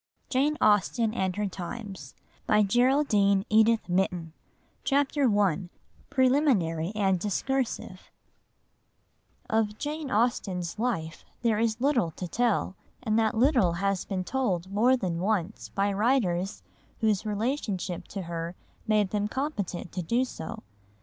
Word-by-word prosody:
JANE 285 +4 +1
AUSTEN 215 +2 +3
AND 190 -5 -1
HER 210 - -1
TIMES 190 - -7 0.3
CHAPTER 245 +8 +3 2.5
I 180 -2 -9 0.4
PRELIMINARY 250 - +2
AND 195 -3 +2
DISCURSIVE 250 +6 -2 1.4
Of 215 -1 0
Jane 300 +1 -4
Austen's 205 -6 0
life 165 -10 -2 0.2
there 225 -3 +2
is 225 0 0
little 255 - +2
to 180 +3 -6
tell, 225 -2 0 0.3
and 220 -2 +2
that 220 0 +1
little 240 - +4
has 195 +1 0
been 185 -2 -2
told 190 -7 -1
more 240 +6 +4
than 180 -7 -2
once 200 0 -1
by 200 +1 0
writers 195 -5 +1 0.4
whose 215 -3 +2
relationship 210 -5 -2
to 195 -2 -5
her 170 0 -5 0.3
made 210 -3 +2
them 210 -1 0
competent 210 - -3
to 180 - -3
do 235 +9 +1
so. 225 -3 -7
210 Hz, 115 wpm, -28 LUFS, 185-245 Hz, 2.5 s, little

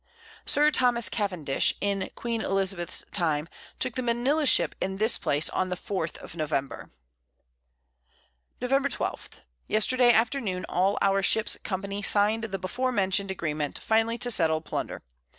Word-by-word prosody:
Sir 300 +1 +5
Thomas 240 -7 +3
Cavendish, 180 -10 0
in 200 -1 -1
Queen 230 -2 -3
Elizabeth's 190 -4 0
Time, 160 -5 0 0.3
took 255 -2 -1
the 255 - -2
Manila 255 +6 +1
Ship - - +4
in 190 0 -2
this 220 +3 +3
Place 145 +2 +1
on 185 - -1
the 180 - -2
4th 180 -3 -4
of - - -10
November. 150 -4 -3 1.7
Nov. 270 +3 +1
12. - - -4 0.4
Yesterday 240 +3 +4
Afternoon, 225 -5 0
all 190 +3 +1
our 195 0 +2
Ships 220 +3 +3
Company 200 +1 -4
sign'd 210 +2 +3
the 195 -3 -4
before 245 +8 -2
mention'd 195 -2 0
Agreement, 150 -5 -3
finally 225 +1 +1
to 245 0 +1
settle 160 -6 +3
Plunder. - - -5
200 Hz, 140 wpm, -26 LUFS, 185-235 Hz, 1.7 s, Sir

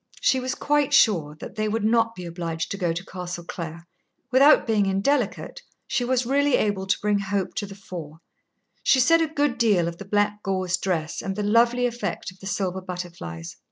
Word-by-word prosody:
She 260 - +3
was 255 0 -3
quite 290 -1 +2
sure 160 -9 +3
that - - -8
they 215 0 0
would 220 0 -1
not 230 0 +2
be 180 - -7
obliged 165 -1 -4
to 200 - -3
go 175 -3 0
to 170 +3 -4
Castle 180 -1 -6
Clare. 170 -1 -7 0.5
Without 275 +4 +6
being 215 -3 +2
indelicate, 205 +5 0 0.2
she 245 - -1
was 250 0 +1
really 280 +2 +3
able 200 -2 0
to - - +2
bring 210 -1 +2
hope 195 -1 -2
to 205 - -2
the 195 - -10
fore. 170 -6 -8 0.6
She 265 - +4
said 330 +6 +5
a 325 - +2
good 290 -5 0
deal 205 -8 +3
of 170 0 -6
the 195 - -7
black 205 +1 0
gauze 185 -2 0
dress 175 -4 -2
and 195 - -4
the 210 - -2
lovely 235 +4 +3
effect 240 -5 -3
of 185 - -20
the 195 - -8
silver 190 -2 -2
butterflies. 175 - -7
200 Hz, 200 wpm, -24 LUFS, 180-240 Hz, 0.6 s, Without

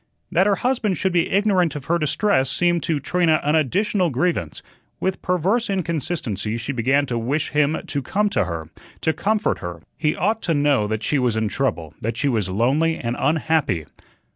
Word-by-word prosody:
That 185 +3 +3
her 205 - +3
husband 230 -4 0
should 190 -2 0
be 170 -2 +2
ignorant 190 -6 +2
of 140 -3 -6
her 170 +2 +1
distress 150 -2 +1
seemed 175 +3 +1
to 155 -3 -1
Trina 165 +1 +2
an 150 - +1
additional 180 - +1
grievance. 130 - -1 0.4
With 190 0 -2
perverse 190 +7 +1
inconsistency 155 - -2
she 115 +4 -3
began 135 +3 +2
to 120 -3 -2
wish 140 +7 -1
him 150 +1 +2
to 145 -4 -2
come 205 +11 0
to 105 - +1
her, 80 -2 -6 0.3
to 160 - +1
comfort 215 +6 0
her. 85 -1 -6 0.2
He 155 -1 +1
ought 220 +4 0
to 165 - 0
know 145 -7 +2
that 110 +1 -3
she 145 - +1
was 125 -3 +1
in 110 -1 0
trouble, 85 - -2
that 115 +1 -3
she 145 - 0
was 110 -8 0
lonely 140 +11 +1
and 120 0 -3
unhappy. 155 - +1
150 Hz, 190 wpm, -22 LUFS, 120-180 Hz, 0.4 s, That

